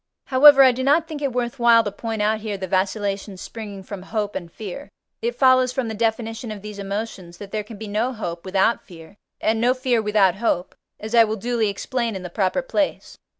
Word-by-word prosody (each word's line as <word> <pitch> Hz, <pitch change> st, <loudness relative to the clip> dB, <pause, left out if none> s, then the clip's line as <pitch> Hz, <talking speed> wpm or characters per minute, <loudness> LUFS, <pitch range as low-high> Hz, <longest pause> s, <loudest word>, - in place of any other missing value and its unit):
However, 275 Hz, +1 st, +8 dB
I 260 Hz, -, +7 dB
do 250 Hz, +1 st, -4 dB
not 305 Hz, +4 st, +3 dB
think 310 Hz, -3 st, -6 dB
it 280 Hz, -2 st, 0 dB
worth 245 Hz, +1 st, -3 dB
while 235 Hz, -1 st, +6 dB
to 205 Hz, -, -3 dB
point 220 Hz, +1 st, -3 dB
out 215 Hz, +1 st, +1 dB
here 210 Hz, -2 st, -4 dB
the 190 Hz, -, -4 dB
vacillations 195 Hz, +1 st, -2 dB
springing 205 Hz, -3 st, -8 dB
from 195 Hz, 0 st, -8 dB
hope 210 Hz, +1 st, -3 dB
and 170 Hz, -2 st, -6 dB
fear; 220 Hz, +9 st, -8 dB, 0.3 s
it 470 Hz, +2 st, -2 dB
follows 255 Hz, -1 st, +4 dB
from 255 Hz, -2 st, -2 dB
the -, -, -4 dB
definition 225 Hz, +1 st, -2 dB
of 210 Hz, -2 st, -7 dB
these 210 Hz, -1 st, -8 dB
emotions, 195 Hz, -3 st, -5 dB
that 200 Hz, +1 st, -10 dB
there 215 Hz, -1 st, -2 dB
can 215 Hz, +1 st, -11 dB
be 220 Hz, +1 st, -7 dB
no 215 Hz, +5 st, 0 dB
hope 175 Hz, -8 st, -5 dB
without 190 Hz, +4 st, +1 dB
fear, 170 Hz, 0 st, -14 dB, 0.3 s
and 220 Hz, +1 st, +1 dB
no 250 Hz, +2 st, +3 dB
fear 255 Hz, -3 st, +1 dB
without 205 Hz, -3 st, +2 dB
hope, 190 Hz, -5 st, -1 dB, 0.3 s
as 215 Hz, +2 st, -7 dB
I 230 Hz, -1 st, +7 dB
will 215 Hz, 0 st, -1 dB
duly 230 Hz, 0 st, 0 dB
explain 235 Hz, +2 st, -2 dB
in 190 Hz, -, -6 dB
the 180 Hz, -, -7 dB
proper 195 Hz, +8 st, 0 dB
place. 290 Hz, +2 st, -2 dB
220 Hz, 220 wpm, -22 LUFS, 200-245 Hz, 0.3 s, However